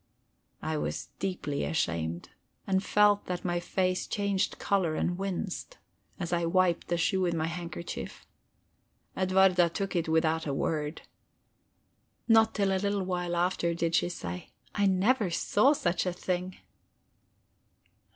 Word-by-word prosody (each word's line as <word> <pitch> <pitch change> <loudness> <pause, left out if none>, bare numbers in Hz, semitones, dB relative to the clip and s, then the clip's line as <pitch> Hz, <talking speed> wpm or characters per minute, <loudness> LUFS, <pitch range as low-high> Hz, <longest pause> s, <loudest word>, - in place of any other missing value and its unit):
I 155 -1 -1
was 120 - -3
deeply 180 -7 -2
ashamed, 85 - -2 0.4
and 190 0 +1
felt 205 0 +3
that 180 0 -4
my 175 -1 0
face 185 +1 -1
changed 200 -1 0
color 185 -6 +1
and 175 - 0
winced, 195 - -4 0.4
as 175 -2 -3
I 170 0 +1
wiped 175 0 +2
the 175 - 0
shoe 190 +3 +1
with 175 -2 +1
my 160 -1 0
handkerchief. 170 +1 -6 0.9
Edwarda 185 -2 +4
took 195 +3 -3
it 165 -2 0
without 160 0 +1
a 140 - -1
word. 150 +1 -2 1.2
Not 225 -1 +5
till 200 -2 +2
a 190 -1 +1
little 200 -1 0
while 180 -1 -2
after 170 -1 +1
did 170 0 -1
she 175 - +2
say: 90 - -6 0.2
"I 200 -1 +2
never 195 +3 +2
saw 205 - +3
such 175 - 0
a 180 - 0
thing!" 180 +1 -3
180 Hz, 140 wpm, -29 LUFS, 165-195 Hz, 1.2 s, Not